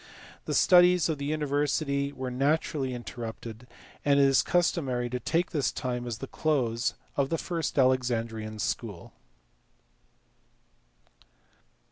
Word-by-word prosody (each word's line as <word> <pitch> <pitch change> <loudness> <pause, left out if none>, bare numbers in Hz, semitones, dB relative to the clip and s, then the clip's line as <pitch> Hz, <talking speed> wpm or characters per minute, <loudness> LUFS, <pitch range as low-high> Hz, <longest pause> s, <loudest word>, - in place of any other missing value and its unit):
The - - -2
studies 180 -2 +5
of 155 -3 -2
the 140 - -3
university 145 -1 0
were 130 -2 -5
naturally 135 0 0
interrupted, 115 -1 -7 0.4
and 140 -1 +4
it - - +6
is 135 -1 +5
customary 135 -9 0
to 125 - -2
take 170 +6 0
this 140 -6 0
time 125 -1 -3
as 115 -2 -4
the 135 - -6
close 125 -6 0 0.2
of 140 -1 +1
the 165 - 0
first 165 -2 -3
Alexandrian 115 -4 +1
school. 105 -3 -4
135 Hz, 120 wpm, -28 LUFS, 120-150 Hz, 0.4 s, it